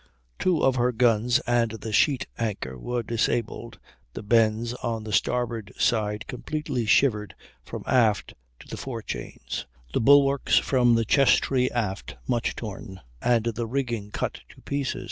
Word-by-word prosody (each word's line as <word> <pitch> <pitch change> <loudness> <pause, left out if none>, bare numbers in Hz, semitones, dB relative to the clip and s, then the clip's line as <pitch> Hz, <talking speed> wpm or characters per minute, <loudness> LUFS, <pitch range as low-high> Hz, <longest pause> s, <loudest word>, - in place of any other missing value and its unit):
Two 180 -4 +1
of 130 -1 +3
her 125 +1 +2
guns 120 0 +3
and 120 -1 +2
the 110 0 -6
sheet 135 +3 +3
anchor 105 - -3
were 120 - -3
disabled, 115 0 -2 0.4
the - - -7
bends 115 +1 +2
on 115 -2 -4
the 105 -1 -6
starboard 115 +1 0
side 105 -2 0
completely 125 -2 -3
shivered 105 -4 +2 0.3
from - - -7
aft 110 -5 +2 0.3
to - - -16
the - - -7
forechains, 115 -5 -6 0.3
the - - +1
bulwarks 140 +2 +5
from 120 -3 +3
the 115 0 +1
chess 135 +3 +5
tree 130 -2 +1
aft 105 -5 -3
much 120 -2 0
torn, 100 -3 -7 0.2
and 120 -2 +2
the 115 +1 -3
rigging 120 -5 -2
cut - - -3
to - - -17
pieces. 140 -2 -2
115 Hz, 150 wpm, -25 LUFS, 110-125 Hz, 0.4 s, bulwarks